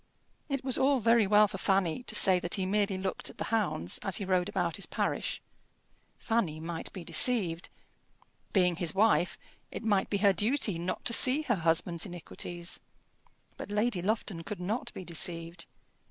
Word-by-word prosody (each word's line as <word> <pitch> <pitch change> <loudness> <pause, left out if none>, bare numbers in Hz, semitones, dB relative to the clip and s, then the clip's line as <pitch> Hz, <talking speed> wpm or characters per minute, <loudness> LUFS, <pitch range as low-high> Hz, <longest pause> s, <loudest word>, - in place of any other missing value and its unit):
It 275 -2 -2
was 260 -1 +1
all 270 0 +3
very 230 -2 +4
well 210 +1 +5
for 195 - -7
Fanny 190 +1 +1
to - - -4
say 185 -2 +5
that 175 0 -1
he 190 - -2
merely 200 0 0
looked 190 0 -3
at - - -14
the - - -3
hounds 175 - -1
as 195 - 0
he 200 - -4
rode 185 -1 +1
about 175 -4 -1
his 200 - -5
parish. - - -2 0.8
Fanny 195 -10 -1
might 165 +1 -6
be 185 - -8
deceived. 170 -1 +2 0.8
Being 180 -4 +2
his 170 -2 -1
wife, 190 -5 +2 0.3
it - - -7
might 205 -3 +1
be 200 - 0
her 200 -1 +4
duty 210 -1 +1
not 175 +2 -4
to 235 - +1
see 265 +6 +6
her 255 - +1
husband's 170 +2 0
iniquities. 175 0 -5 0.8
But - - -7
Lady 210 -2 0
Lufton 200 -3 -2
could 200 +4 -7
not 205 +7 -3
be 185 - -7
deceived. 170 0 -2
190 Hz, 175 wpm, -30 LUFS, 175-215 Hz, 0.8 s, see